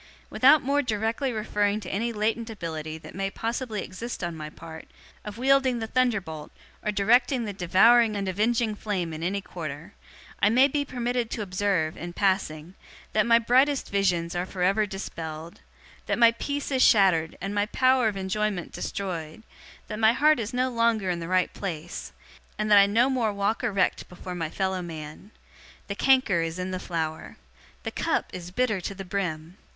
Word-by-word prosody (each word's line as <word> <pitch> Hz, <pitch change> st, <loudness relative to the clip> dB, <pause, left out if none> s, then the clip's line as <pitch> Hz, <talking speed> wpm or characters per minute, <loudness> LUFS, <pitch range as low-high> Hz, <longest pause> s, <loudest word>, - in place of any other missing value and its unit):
'Without 280 Hz, +4 st, +5 dB
more 280 Hz, +2 st, +2 dB
directly 225 Hz, +2 st, -1 dB
referring 210 Hz, -2 st, 0 dB
to 190 Hz, -4 st, -8 dB
any 230 Hz, +4 st, -1 dB
latent 225 Hz, +2 st, -1 dB
ability 160 Hz, -6 st, -5 dB
that 160 Hz, -, -12 dB
may 195 Hz, 0 st, -2 dB
possibly 225 Hz, 0 st, -3 dB
exist 230 Hz, +3 st, -6 dB
on 170 Hz, -1 st, -3 dB
my 155 Hz, -1 st, -6 dB
part, 160 Hz, +1 st, -11 dB, 0.4 s
of 210 Hz, +1 st, -8 dB
wielding 265 Hz, 0 st, +3 dB
the 225 Hz, -, -3 dB
thunderbolt, 205 Hz, -11 st, -1 dB, 0.3 s
or 210 Hz, -, 0 dB
directing 240 Hz, +5 st, +2 dB
the 205 Hz, -, -4 dB
devouring 215 Hz, +5 st, +4 dB
and 200 Hz, -1 st, -2 dB
avenging 220 Hz, +4 st, +1 dB
flame 190 Hz, -6 st, -3 dB
in 155 Hz, -, -6 dB
any 195 Hz, +4 st, -1 dB
quarter, 160 Hz, 0 st, -7 dB, 0.5 s
I 205 Hz, -, +5 dB
may 255 Hz, +5 st, +5 dB
be 285 Hz, +1 st, -1 dB
permitted 245 Hz, -2 st, -2 dB
to 215 Hz, -, -3 dB
observe, 185 Hz, -4 st, -1 dB
in 175 Hz, +1 st, -7 dB
passing, 180 Hz, -4 st, -1 dB, 0.4 s
that 215 Hz, +1 st, +2 dB
my 230 Hz, 0 st, +6 dB
brightest 260 Hz, +4 st, +2 dB
visions 180 Hz, -4 st, 0 dB
are 175 Hz, +1 st, -2 dB
for 185 Hz, -2 st, -4 dB
ever 200 Hz, +3 st, +2 dB
dispelled 165 Hz, -5 st, -7 dB, 0.5 s
that -, -, 0 dB
my 235 Hz, -1 st, +7 dB
peace 285 Hz, +5 st, -4 dB
is 260 Hz, -1 st, +1 dB
shattered 185 Hz, -9 st, +4 dB
and 195 Hz, +2 st, -4 dB
my 205 Hz, 0 st, +1 dB
power 255 Hz, 0 st, +3 dB
of 205 Hz, -2 st, -2 dB
enjoyment 190 Hz, -1 st, -2 dB
destroyed 175 Hz, -2 st, -5 dB, 0.4 s
that 215 Hz, -, -5 dB
my 220 Hz, +1 st, +5 dB
heart 305 Hz, +2 st, +4 dB
is 220 Hz, -1 st, -3 dB
no 255 Hz, +1 st, 0 dB
longer 230 Hz, -5 st, +1 dB
in 175 Hz, -, -3 dB
the 165 Hz, -, -5 dB
right 185 Hz, 0 st, +1 dB
place 175 Hz, -3 st, -6 dB, 0.5 s
and 215 Hz, 0 st, -1 dB
that 205 Hz, -, +9 dB
I 200 Hz, -, +6 dB
no 230 Hz, +5 st, +3 dB
more 250 Hz, -5 st, 0 dB
walk 200 Hz, +4 st, -1 dB
erect 200 Hz, -6 st, 0 dB
before 180 Hz, 0 st, -8 dB
my 165 Hz, -3 st, -3 dB
fellow 190 Hz, +1 st, -2 dB
man. 160 Hz, +2 st, -8 dB, 0.6 s
The 200 Hz, -, -4 dB
canker 255 Hz, -6 st, +3 dB
is 165 Hz, +1 st, -3 dB
in 185 Hz, 0 st, -3 dB
the 185 Hz, -, -3 dB
flower. 160 Hz, -3 st, -4 dB, 0.5 s
The -, -, -4 dB
cup -, -, -1 dB
is 180 Hz, -1 st, -7 dB
bitter 215 Hz, 0 st, 0 dB
to 195 Hz, -, -5 dB
the 195 Hz, 0 st, -7 dB
brim. 175 Hz, -2 st, -4 dB
200 Hz, 180 wpm, -26 LUFS, 180-230 Hz, 0.6 s, that